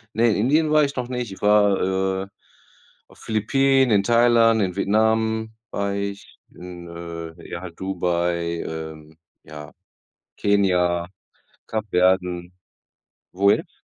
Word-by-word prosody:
Ne, 115 +1 +3
in - - 0
Indien 150 +8 +2
war 155 0 +5
ich 140 -1 -2
noch 125 -1 -3
nicht, 125 -4 -4
ich 95 - -11
war, 95 -2 +2
äh, - - -10 0.8
auf - - -20
Philippinen, 135 +4 +2
in 100 -2 +4
Thailand, 115 -1 +4
in 90 -3 -1
Vietnam 110 +2 +1 0.2
war 100 0 -2
ich, 100 0 -6
in, 90 -1 -10
äh, 85 0 -8
ja, 85 - -6
halt 85 -2 -10
Dubai, 85 -2 -1
ähm, 80 -1 -8 0.3
ja, 75 -1 -10 0.7
Kenia, 90 -4 +1 0.6
Kapverden 90 -4 0 0.8
Wo 100 +2 +3
jetzt? - - -3
95 Hz, 125 wpm, -22 LUFS, 85-110 Hz, 0.8 s, war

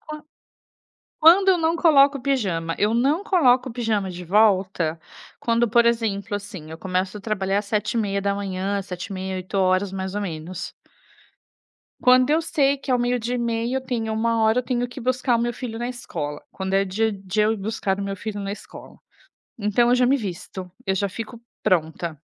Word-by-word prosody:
Quan 305 -1 -9 1.0
quando 370 +5 +7
eu 370 - +6
não 325 0 +1
coloco 285 -5 +5
pijama, 190 -12 -1
eu 210 +2 +2
não 280 - +1
coloco 260 - +3
pijama 220 -5 -1
de 180 0 -7
volta 185 -4 +2 0.4
quando, 235 0 +2
por 235 +2 +4
exemplo, 215 -4 0
assim, 190 -6 -7
eu 160 - -7
começo 185 +1 -2
a - - -7
trabalhar 200 -1 -1
7h30, 200 -2 -1
7h30, 190 0 -5
8h, 185 +2 -5 0.4
mais 190 0 -4
ou 205 - -1
menos. 170 -1 -5 1.3
Quando 255 +2 +5
eu 315 +2 +4
sei 285 -4 +1
que 265 -1 -3
ao 250 - +3
meio-dia 245 0 0
e - - -1
meia, 235 +1 -1
eu - - 0
tenho 235 -4 -3
13h 220 0 +2
eu 250 - +1
tenho 245 -1 -1
que 245 +2 -9
buscar 255 0 +1
o - - -1
meu 240 0 0
filho 230 -2 -6
na 240 - -2
escola, 155 -12 -5
quando 190 0 -3
é 195 0 +3
dia 220 +4 0
de 195 +1 -3
eu 215 +1 +3
ir - - -2
buscar 200 -1 -2
o - - -2
meu 195 0 -3
filho 210 +2 -5
na 200 0 -3
escola. - - -11 0.6
Então 210 +3 +2
eu 250 - +5
já 250 0 +3
me 275 +3 +3
visto, 185 -3 -6 0.2
eu 190 - +1
já 200 +1 0
fico 225 +4 -7 0.2
pronta. 160 -4 0
215 Hz, 180 wpm, -23 LUFS, 190-245 Hz, 1.3 s, quando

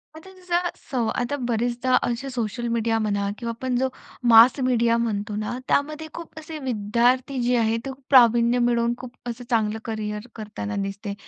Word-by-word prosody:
म्हणजे 320 +4 -12
जसं 355 -1 -1 0.2
सव 245 -4 0
आता 245 +3 -1
बरेचदा 240 +2 +1
असे 240 +3 -2
सोशल 240 -1 -3
मीडिया 230 -1 0
म्हणा, 200 -2 0
किंवा 235 -2 -4
आपण 255 0 -2
जो 265 +1 +2 0.4
मास 235 +4 +8
मीडिया 235 -3 +2
म्हणतो 210 -3 -2
ना, 215 +3 -3
त्यामध्ये 305 +2 0
खूप 335 -2 -9
असे 315 0 -8
विद्यार्थी 250 +2 +1
जे 245 +1 +2
आहेत, 225 0 +1
ते - - -3
खूप 265 +1 -14
प्रावीण्य 240 -2 +5
मिळवून 235 -1 +2
खूप 255 -1 -9 0.2
असं 240 +1 -6
चांगलं 220 -2 +1
करिअर 215 0 -4
करताना 215 -1 -5
दिसते. 200 +1 -5
235 Hz, 170 wpm, -24 LUFS, 220-260 Hz, 0.4 s, मास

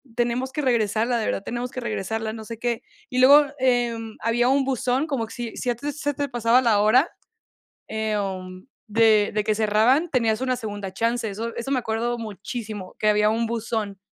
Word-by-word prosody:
tenemos 245 +2 0
que 300 - -2
regresarla, 235 -2 +1
de 220 - -1
verdad 195 - -2
tenemos 245 +3 -4
que - - -5
regresarla, 220 -1 -3
no 220 -1 -7
sé 230 0 -8
qué, 235 -1 -1 0.3
y 250 - -1
luego, 285 +3 +8
em, 240 -3 0
había 240 +2 +2
un 270 0 +3
buzón, 260 +2 0
como 270 -7 -1
que 225 - -12
si 235 -2 -6
si 250 - -3
a 240 - +1
ti 285 +5 -5
se 290 -1 -2
te 285 +1 -2
pasaba 240 0 +3
la 225 -5 +3
hora, 250 +9 +4 0.8
em, 195 -4 -3 0.2
de 215 -1 +4
de 210 -1 +1
que 215 0 +1
cerraban, 220 +9 +3
tenías 230 -5 +1
una 255 -1 0
segunda 205 -4 -5
chance, 230 +4 -1
eso 225 +3 -5
eso 235 +3 -5
me 275 - +2
acuerdo 235 +1 -1
muchísimo, 215 -2 -6
que 215 - +1
había 210 0 +3
un 225 +2 +1
buzón, 220 -3 -3
230 Hz, 195 wpm, -24 LUFS, 215-250 Hz, 0.8 s, luego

